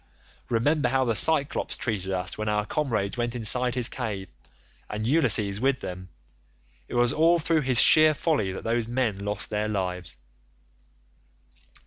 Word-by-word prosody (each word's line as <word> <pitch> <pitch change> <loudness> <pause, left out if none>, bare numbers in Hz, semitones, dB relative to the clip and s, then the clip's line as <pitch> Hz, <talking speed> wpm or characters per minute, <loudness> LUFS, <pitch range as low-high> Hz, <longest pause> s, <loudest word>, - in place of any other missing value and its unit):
Remember 125 +3 +1
how 130 +1 +1
the 115 - +1
Cyclops 145 +3 +1
treated 100 -5 -2
us 95 0 -3
when 110 0 -3
our 105 0 0
comrades 110 -8 -2
went 120 0 -2
inside 125 +2 +1
his 125 -2 +2
cave, 105 -7 -5 0.6
and 105 +1 -4
Ulysses 110 -8 +1
with 135 0 +1
them. 90 0 -7 0.8
It - - -7
was 120 0 +2
all 165 +2 +4
through 165 -1 +1
his 130 -4 0
sheer 155 +1 +6
folly 140 - 0
that 95 - -7
those 115 0 -1
men 120 -5 -1
lost 105 +1 -4
their 105 0 -1
lives. 90 -5 -4
115 Hz, 150 wpm, -26 LUFS, 105-130 Hz, 0.8 s, sheer